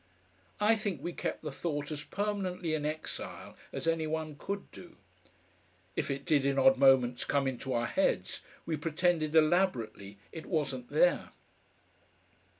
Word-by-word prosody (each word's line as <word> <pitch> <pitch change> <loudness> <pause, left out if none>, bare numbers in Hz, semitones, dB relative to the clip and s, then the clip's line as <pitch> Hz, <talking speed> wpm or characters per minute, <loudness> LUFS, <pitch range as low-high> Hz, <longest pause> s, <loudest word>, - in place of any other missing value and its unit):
I 210 +2 +5
think 205 - -2
we 175 - -3
kept - - -4
the 150 - -4
thought 145 0 -3
as 150 -1 -4
permanently 190 -5 -2
in 150 -1 0
exile 155 +1 -5 0.2
as - - -4
any 165 -1 +1
one 155 -1 -3
could 200 +7 -5
do. 175 - -12 1.0
If - - -1
it 140 0 -3
did 150 -5 +3
in 140 0 +1
odd 135 0 +6
moments 130 -3 +5
come 140 -1 +1
into 130 0 -3
our 120 0 +1
heads - - 0 0.2
we 160 -2 -1
pretended 160 0 +1
elaborately 155 - +2
it 160 - -8
wasn't 170 - -2
there. - - +2
155 Hz, 150 wpm, -31 LUFS, 140-175 Hz, 1.0 s, odd